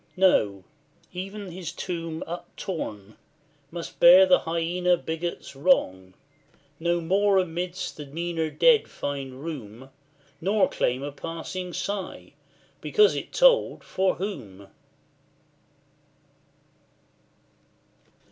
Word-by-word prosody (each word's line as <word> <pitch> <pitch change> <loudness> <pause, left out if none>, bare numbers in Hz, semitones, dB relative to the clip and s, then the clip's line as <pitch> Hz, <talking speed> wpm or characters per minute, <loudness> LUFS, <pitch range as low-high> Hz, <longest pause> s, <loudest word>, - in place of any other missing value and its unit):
No; 105 - +3 0.5
even 195 +1 -6
his 175 -2 -6
tomb 165 -2 -5
Uptorn, 160 - -6 0.5
must 170 +1 -8
bear 180 +2 +9
the 185 -1 +5
hyaena 175 +2 0
bigots' 165 -2 -5
wrong, 95 - +1 0.6
No 170 +1 +1
more 195 +4 +2
amidst 180 0 -2
the 150 -2 -8
meaner 165 +2 -2
dead 470 - +4
find 135 -1 -5
room, 130 -4 -8 0.5
Nor 200 +4 +3
claim 125 +2 -1
a 145 - -4
passing 165 +5 -6
sigh, 185 - -5 0.5
because 175 +4 +4
it 140 - -5
told - - +4
for 190 0 0
WHOM? 115 - -7
170 Hz, 95 wpm, -26 LUFS, 140-185 Hz, 0.6 s, bear